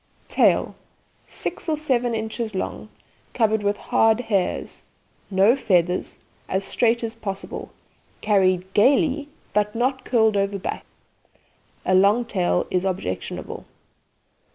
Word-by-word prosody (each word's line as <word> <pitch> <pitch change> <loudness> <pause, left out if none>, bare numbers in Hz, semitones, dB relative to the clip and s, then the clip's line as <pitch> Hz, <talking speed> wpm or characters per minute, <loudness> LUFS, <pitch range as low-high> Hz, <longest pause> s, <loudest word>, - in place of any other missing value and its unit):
TAIL - - +3 0.5
Six - - -4
or 310 - +1
seven 250 -6 0
inches 220 -1 -3
long, 190 - -4 0.5
covered 220 -2 +2
with 205 0 0
hard 225 0 +2
hairs, 200 -6 -2 0.5
no 200 +5 +4
feathers, 180 -8 0 0.3
as 190 +1 0
straight 235 +3 +1
as 225 -1 -3
possible; 200 -4 -6 0.5
carried 190 -3 +1
gaily, 280 +5 +3 0.2
but 210 +1 +1
not 260 +3 0
curled 220 -3 +2
over 200 0 0
back. 190 - -5 1.0
A 185 - +2
long 200 +6 +4
tail 180 -4 0
is 180 0 +1
objectionable. 185 - -4
210 Hz, 115 wpm, -23 LUFS, 190-235 Hz, 1.0 s, no